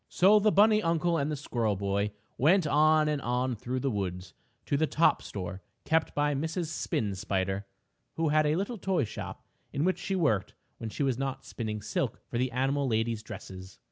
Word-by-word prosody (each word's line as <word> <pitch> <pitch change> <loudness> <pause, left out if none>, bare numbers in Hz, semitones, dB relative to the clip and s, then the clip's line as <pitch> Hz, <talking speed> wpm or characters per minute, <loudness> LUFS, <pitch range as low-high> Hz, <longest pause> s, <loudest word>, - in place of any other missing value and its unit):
So 200 +4 +5
the 215 +1 +3
bunny 215 +2 +5
uncle 165 -1 +1
and 140 +2 -1
the - - -1
squirrel 120 -7 -1
boy 100 +1 0 0.3
went 170 +6 +4
on 155 +1 +4
and 150 -2 0
on 125 +1 0
through 125 +4 -3
the 135 - 0
woods 90 -3 -4 0.3
to - - 0
the 155 +2 +2
top 165 +3 +3
store 95 -1 -6 0.2
kept 160 0 +1
by 145 0 +2
Mrs. 160 +3 -2
Spin 110 -9 -1
Spider, 95 +1 -2 0.5
who 165 -1 +1
had 155 0 +3
a 150 - +2
little 200 +5 -2
toy 185 -4 +1
shop 105 - -7 0.3
in 140 - -1
which 185 +2 +1
she 195 - -2
worked 140 - +1 0.2
when 115 - -4
she 140 - -3
was 130 -3 0
not 135 -1 -3
spinning 105 -3 -4
silk 105 - -2
for 120 - -1
the 130 +1 +1
animal 135 +3 0
ladies' 110 -1 0
dresses. 95 -4 -9
135 Hz, 195 wpm, -29 LUFS, 105-160 Hz, 0.5 s, So